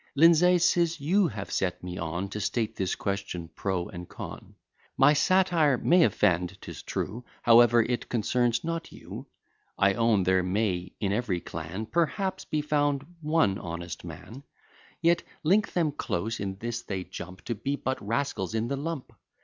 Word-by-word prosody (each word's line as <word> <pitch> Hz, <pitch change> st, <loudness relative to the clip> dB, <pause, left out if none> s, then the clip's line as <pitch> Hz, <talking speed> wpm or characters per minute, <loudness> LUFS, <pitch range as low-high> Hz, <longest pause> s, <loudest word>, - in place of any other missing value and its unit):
Lindsay, 170 Hz, +4 st, +6 dB
'tis 170 Hz, -1 st, +2 dB
you 180 Hz, +7 st, +3 dB
have 105 Hz, -6 st, -6 dB
set 90 Hz, -2 st, -1 dB
me 90 Hz, 0 st, -5 dB
on, 85 Hz, +4 st, -3 dB
To 105 Hz, -, -5 dB
state 110 Hz, +2 st, -1 dB
this 95 Hz, -2 st, -1 dB
question 100 Hz, -4 st, -4 dB
pro 95 Hz, -2 st, -2 dB
and 90 Hz, 0 st, -9 dB
con. -, -, -9 dB, 0.4 s
My 145 Hz, -, +6 dB
satire 165 Hz, -3 st, +3 dB
may 175 Hz, +5 st, +4 dB
offend, 95 Hz, -, +2 dB
'tis -, -, -9 dB
true; 115 Hz, +6 st, -4 dB, 0.2 s
However, 120 Hz, 0 st, +7 dB
it 120 Hz, +1 st, -3 dB
concerns 120 Hz, +1 st, +1 dB
not 165 Hz, 0 st, -3 dB
you. -, -, -9 dB, 0.5 s
I 100 Hz, 0 st, +4 dB
own, 115 Hz, -3 st, +3 dB
there 95 Hz, 0 st, +3 dB
may, 90 Hz, -1 st, -1 dB
in 100 Hz, -2 st, 0 dB
every 105 Hz, -5 st, 0 dB
clan, 85 Hz, +6 st, -6 dB
Perhaps, 175 Hz, -, -1 dB
be 155 Hz, -, -1 dB
found 145 Hz, -2 st, +1 dB, 0.2 s
one 155 Hz, -11 st, +2 dB
honest 85 Hz, 0 st, -6 dB
man; 125 Hz, +5 st, -9 dB, 0.6 s
Yet 170 Hz, +1 st, +4 dB, 0.2 s
link 195 Hz, +7 st, +3 dB
them 165 Hz, -4 st, +2 dB
close, 115 Hz, -4 st, -3 dB
in 95 Hz, -1 st, -3 dB
this 115 Hz, +2 st, -4 dB
they 95 Hz, -4 st, -4 dB
jump, 90 Hz, +1 st, -9 dB
To 120 Hz, -, -1 dB
be 125 Hz, +6 st, -2 dB
but 130 Hz, -1 st, -3 dB
rascals 110 Hz, -2 st, -2 dB
in 110 Hz, +1 st, -1 dB
the 140 Hz, -, -1 dB
lump. 155 Hz, -1 st, -5 dB
115 Hz, 165 wpm, -28 LUFS, 95-150 Hz, 0.6 s, However